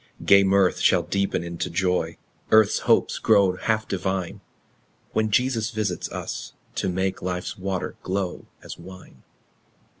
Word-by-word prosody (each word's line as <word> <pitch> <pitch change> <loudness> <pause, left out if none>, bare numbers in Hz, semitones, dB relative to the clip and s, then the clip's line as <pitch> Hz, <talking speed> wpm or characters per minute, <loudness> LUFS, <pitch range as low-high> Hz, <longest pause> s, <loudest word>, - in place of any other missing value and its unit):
Gay 100 0 +7
mirth 95 -1 +3
shall - - +3
deepen 100 -2 -1
into 85 -1 -4
joy, 90 +1 0 0.3
Earth's 110 -1 +5
hopes - - +3
grow 100 -4 +4
half 110 +1 -1
divine, 95 -1 -3 0.7
When 110 0 0
Jesus 115 0 +1
visits 105 -5 -3
us, - - -6 0.2
to - - -1
make 95 +1 -1
Life's 90 0 -3
water 95 -1 -3
glow 95 -1 -3 0.2
as - - -9
wine. 95 +2 -13
95 Hz, 130 wpm, -24 LUFS, 90-105 Hz, 0.7 s, Gay